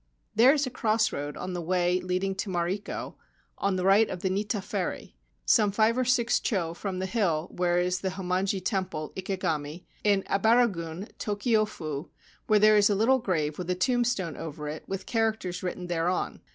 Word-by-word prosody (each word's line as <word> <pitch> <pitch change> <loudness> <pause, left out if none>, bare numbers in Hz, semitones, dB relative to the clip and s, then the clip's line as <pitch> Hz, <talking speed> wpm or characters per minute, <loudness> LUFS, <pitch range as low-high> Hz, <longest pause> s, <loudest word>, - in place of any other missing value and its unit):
There 240 +5 +7
is 290 -1 +2
a 255 - -5
cross 220 -2 +1
road 145 +1 -4
on 185 0 -5
the 175 - -3
way 180 +1 +1
leading 185 +1 -1
to 195 - -3
Mariko, 180 +3 -3 0.5
to 200 - +3
the 185 0 -1
right 200 +3 +5
of 180 - -5
the 190 - 0
Nitta 205 +2 -1
Ferry, - - -4 0.3
some 210 -4 +4
five 220 +3 +3
or 255 0 +1
six 245 -1 +2
cho 170 -7 -1
from 190 +1 -4
the 185 - -2
hill 185 -6 0
where 175 -1 +1
is 180 0 +1
the 190 - -1
Hommonji 185 0 -1
Temple, 185 -7 -2
Ikegami, 175 -4 -3 0.2
in 200 -2 +3
Ebaragun, 195 -5 +1
Tokio 215 +1 +1
fu, 155 -6 -6 0.4
where 215 - +5
there 215 +1 +6
is 205 0 +5
a 205 - +2
little 245 +6 +3
grave 155 -9 -1
with 180 0 -5
a 180 - +1
tombstone 235 - 0
over 150 -2 -6
it 150 +1 -5
and 195 - -2
the - - -15
characters: 220 -6 -1
written 180 0 -4
thereon. 175 +1 -1
190 Hz, 190 wpm, -28 LUFS, 175-215 Hz, 0.5 s, There